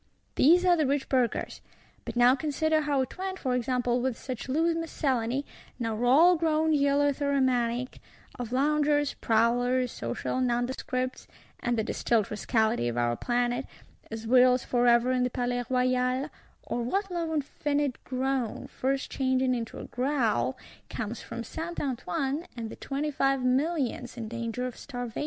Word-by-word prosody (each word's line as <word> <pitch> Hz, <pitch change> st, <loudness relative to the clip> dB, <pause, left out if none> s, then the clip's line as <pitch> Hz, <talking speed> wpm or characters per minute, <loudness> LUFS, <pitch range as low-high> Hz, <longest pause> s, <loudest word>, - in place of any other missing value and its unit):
—These 350 Hz, +6 st, +5 dB
are 355 Hz, -1 st, +6 dB
the 310 Hz, -4 st, +1 dB
rich 280 Hz, 0 st, 0 dB
Burghers: 255 Hz, -3 st, 0 dB, 0.4 s
but -, -, -5 dB
now 245 Hz, +1 st, +6 dB
consider 310 Hz, +2 st, +1 dB
how 285 Hz, -3 st, +1 dB
it 260 Hz, -, -10 dB
went, 380 Hz, 0 st, -3 dB
for 260 Hz, -8 st, -1 dB
example, 250 Hz, 0 st, 0 dB
with 255 Hz, -2 st, -1 dB
such 255 Hz, -1 st, -6 dB
loose 325 Hz, +5 st, +2 dB
miscellany, 275 Hz, -5 st, -1 dB, 0.3 s
now 230 Hz, -1 st, -2 dB
all 315 Hz, +9 st, +6 dB
grown 315 Hz, -1 st, +2 dB
eleutheromaniac, 280 Hz, -4 st, +1 dB, 0.4 s
of 240 Hz, -2 st, -5 dB
Loungers, 290 Hz, +2 st, +2 dB
Prowlers, 245 Hz, +2 st, +2 dB
social 120 Hz, -, -3 dB
Nondescripts 255 Hz, +1 st, -2 dB, 0.3 s
(and 240 Hz, -1 st, -1 dB
the 220 Hz, -, +1 dB
distilled 225 Hz, -1 st, 0 dB
Rascality 220 Hz, -, +1 dB
of 120 Hz, 0 st, -3 dB
our 120 Hz, 0 st, +1 dB
Planet), 245 Hz, -, -1 dB, 0.4 s
as 225 Hz, 0 st, -6 dB
whirls 250 Hz, +2 st, +5 dB
forever 240 Hz, 0 st, +3 dB
in 255 Hz, -1 st, +1 dB
the 250 Hz, -, +1 dB
Palais 245 Hz, 0 st, -2 dB
Royal;—or 255 Hz, 0 st, -1 dB
what 390 Hz, -, -1 dB
low 335 Hz, -2 st, -2 dB
infinite 290 Hz, -1 st, -1 dB
groan, 260 Hz, -2 st, -2 dB
first 270 Hz, +1 st, -2 dB
changing 260 Hz, -1 st, +1 dB
into 230 Hz, -2 st, -4 dB
a -, -, -7 dB
growl, 240 Hz, -, 0 dB, 0.3 s
comes 225 Hz, +1 st, -4 dB
from 230 Hz, 0 st, -6 dB
Saint 325 Hz, +8 st, -5 dB
Antoine, 280 Hz, +3 st, -2 dB
and 225 Hz, -1 st, -5 dB
the -, -, -7 dB
Twenty 290 Hz, +2 st, -3 dB
five 270 Hz, -1 st, +1 dB
Millions 255 Hz, -2 st, 0 dB
in 225 Hz, -2 st, -5 dB
danger 235 Hz, +2 st, -3 dB
of 250 Hz, -, -5 dB
starvation! 245 Hz, -4 st, -6 dB
255 Hz, 145 wpm, -28 LUFS, 240-285 Hz, 0.4 s, are